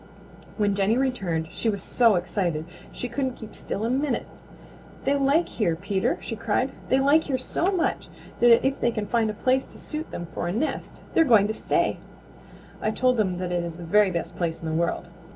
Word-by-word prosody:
When 205 -2 +2
Jenny 200 +4 +2
returned 190 -12 -1
she 230 - -1
was 200 -2 -2
so 230 -4 +4
excited 175 -3 -1 0.3
she 250 - -4
couldn't 260 +1 -2
keep 220 -2 -10
still 210 - -3
a - - 0
minute. 270 0 0 0.8
"They 280 - +2
like 285 +4 +3
here, 175 -8 0
Peter!" 195 +2 0
she 225 - -5
cried. 230 +4 0 0.2
"They 260 - +4
like 285 +4 +4
here 270 -3 0
so 340 +8 -1
much 365 -4 -1 0.3
that 235 0 +6
if 270 +1 0
they - - +3
can 215 -3 -2
find 225 0 +1
a - - -2
place 260 +4 +1
to - - -13
suit 310 +1 -6
them 175 - -5
for - - -3
a - - -1
nest 235 - -3
they're 330 - +6
going 225 -9 +5
to - - 0
stay. - - 0 0.8
I - - +1
told 250 +3 +2
them 190 -5 +1
that 180 -1 -3
it 175 -1 0
is 170 -1 -6
the 175 - -8
very 205 +4 +4
best 170 -1 -4
place 165 -2 -2
in - - -8
the 160 - -2
world. 170 +2 -1
220 Hz, 210 wpm, -25 LUFS, 180-260 Hz, 0.8 s, that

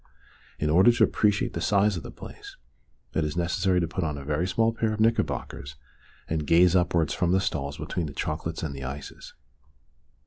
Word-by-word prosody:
In 75 0 0
order 95 +9 +6
to 120 - +3
appreciate 105 -1 +2
the - - -3
size 100 0 +3
of 85 - -4
the - - -9
place - - -11 0.6
it 80 - +1
is 75 +2 -3
necessary 90 +1 +1
to 85 - 0
put 85 +2 -3
on 75 -2 -2
a 70 - -8
very 75 +4 0
small 115 +5 +2
pair 115 -1 0
of 110 - -5
knickerbockers 110 - -1 0.5
and 80 -2 -2
gaze 90 +3 +5
upwards 85 -3 +2
from 90 -1 +1
the 95 - +4
stalls 70 -6 -2
between 85 -3 -3
the 70 - -8
chocolates 80 +2 -3
and 75 -3 -3
the 70 -1 -7
ices. 70 +2 -8
85 Hz, 195 wpm, -26 LUFS, 75-95 Hz, 0.6 s, order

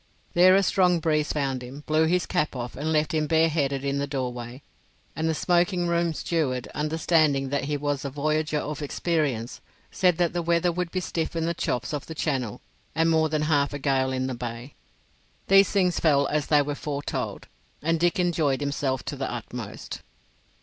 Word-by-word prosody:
There 185 +2 +7
a 195 - +4
strong 180 -2 +3
breeze 155 -2 +1
found 135 -4 -1
him, 130 +4 -9
blew 155 +1 +3
his 180 +1 +1
cap 155 -6 -1
off 120 -1 -5
and 155 +3 -2
left 155 0 +1
him 155 -1 +1
bareheaded 150 -4 +1
in 140 0 0
the 140 - -1
doorway, 125 -2 -5 0.5
and 160 +2 0
the 160 - 0
smoking 175 +2 +2
room 170 0 +1
steward, 135 -9 -1
understanding 155 -2 +1
that 140 0 -1
he 145 +1 -1
was 145 -1 -2
a 140 - -3
voyager 150 +2 0
of 150 0 -4
experience, 145 -6 -1 0.3
said 180 -3 +2
that 175 -2 +1
the 175 - -1
weather 170 +1 +2
would 180 0 -2
be 185 +2 -2
stiff 165 -1 -3
in 165 -1 0
the 170 - 0
chops 125 -5 -2
off 145 - -4
the 160 - -7
Channel 130 -9 -2 0.3
and 165 +1 +3
more 160 -1 +3
than 155 0 0
half 145 -2 +2
a - - -2
gale 135 -2 +1
in 130 0 -1
the 130 - -2
Bay. 120 +2 -6 0.8
These 195 0 +7
things 185 -3 +2
fell 140 -3 +3
as 150 0 -1
they 150 -2 +4
were 145 +1 -3
foretold, 145 0 -4 0.4
and 165 +1 +1
Dick 175 +1 +2
enjoyed 160 -7 +1
himself 140 -2 -2
to - - -4
the - - -3
utmost. - - -7
150 Hz, 190 wpm, -26 LUFS, 140-165 Hz, 0.8 s, There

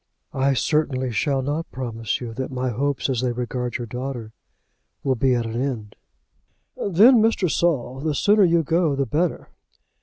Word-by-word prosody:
"I 135 0 +1
certainly 130 0 0
shall 135 +3 0
not 150 +4 -3
promise 115 -3 -3
you 120 -2 -6
that 130 +3 -4
my 130 0 -2
hopes 140 +4 -1
as 130 -3 -1
they 125 -1 0
regard 125 0 -3
your 120 - -5
daughter 125 -2 -6 0.7
will 135 - +2
be 130 +1 +2
at 120 -1 -1
an 115 +2 -3
end." 115 -7 -4 0.8
"Then, 215 +6 +5
Mr. 220 -4 +2
Saul, 135 -6 0
the 150 +1 -1
sooner 205 +6 +4
you 170 -2 +3
go 160 -1 +1
the 140 0 0
better." 155 +7 -1
130 Hz, 170 wpm, -23 LUFS, 125-155 Hz, 0.8 s, Then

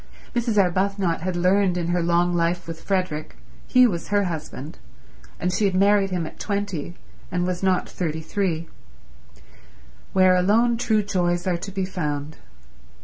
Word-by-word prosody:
Mrs. 235 -3 0
Arbuthnot 190 -2 +1
had 185 +1 -2
learned 180 +1 +2
in 170 -1 -2
her 175 0 +1
long 175 +1 +2
life 170 0 0
with 165 -1 -7
Frederick—he 155 - 0
was 175 -8 -1
her 205 0 +2
husband, 155 -4 -6 0.6
and 180 +1 -1
she 205 +2 +1
had 190 -2 +1
married 200 +1 +4
him 180 -3 -2
at - - -10
twenty 200 -6 -3 0.4
and 180 0 0
was 180 -1 -2
not 190 -1 +1
thirty 160 -3 -3
three—where 65 - -3
alone 220 +6 +3
true 220 -3 +1
joys 175 -3 0
are 180 -2 +1
to 195 +3 -7
be 190 -1 -2
found. 150 -5 -4
180 Hz, 145 wpm, -23 LUFS, 160-195 Hz, 0.6 s, married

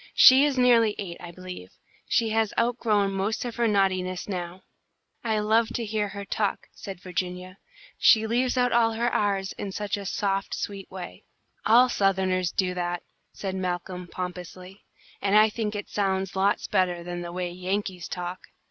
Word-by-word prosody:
"She 265 +2 +9
is 285 -3 0
nearly 235 -4 +5
eight, 175 -4 -5
I 175 - -8
believe. 180 - -9 0.4
She 230 -1 +2
has 220 -1 0
outgrown 225 -4 +2
most 195 +5 -1
of 240 -1 -5
her 235 -1 +2
naughtiness 185 -3 +1
now." 180 -2 -5 0.6
"I 220 -2 0
love 220 +2 +3
to 235 - -2
hear 210 -1 -1
her 200 0 -7
talk," 205 0 -2
said 195 -2 -8
Virginia. 180 +1 -5 0.4
"She 220 -1 +6
leaves 245 +3 +1
out 245 -1 +3
all 230 -1 +3
of - - -6
her 235 0 0
r's 195 -2 0
in 200 - -4
such 205 +1 -2
a 200 -1 -6
soft, 195 0 -1
sweet 195 -2 -5
way." 185 -2 -9 0.4
"All 240 +4 +7
Southerners 190 -5 +1
do 185 -2 0
that," 175 -1 -3 0.3
said 195 -2 -4
Malcolm, 180 -1 -3
pompously, 180 +2 -7 0.4
"and 200 +1 +3
I 215 +1 +6
think 215 -1 -3
it 205 - -4
sounds 195 -2 -1
lots 195 +1 +1
better 180 -2 0
than 175 0 -5
the 175 0 -6
way 180 0 -3
Yankees 185 0 -3
talk." 180 0 -6
195 Hz, 175 wpm, -26 LUFS, 180-220 Hz, 0.6 s, She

